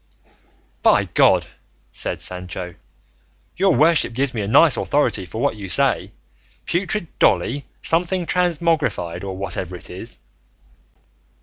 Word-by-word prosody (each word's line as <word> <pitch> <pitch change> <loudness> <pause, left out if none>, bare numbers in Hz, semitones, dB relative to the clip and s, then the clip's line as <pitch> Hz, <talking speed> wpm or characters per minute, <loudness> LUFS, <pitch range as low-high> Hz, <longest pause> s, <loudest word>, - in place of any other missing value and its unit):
"By - - +4
God," - - +3 0.5
said - - -5
Sancho, 90 -1 -6 0.8
"your 190 -3 +3
worship 155 -1 +3
gives 135 +2 -1
me 110 - -2
a 100 - -3
nice 140 +6 +5
authority 125 -10 0
for 110 - -7
what 140 -1 0
you 100 -2 -7
say, - - +2 0.5
putrid 185 +2 +1
Dolly 140 +3 +2 0.2
something 175 +2 +1
transmogrified, 155 - 0
or 95 -1 -5
whatever 90 -2 -4
it 90 - -9
is." 95 +6 -6
125 Hz, 120 wpm, -21 LUFS, -, 0.8 s, nice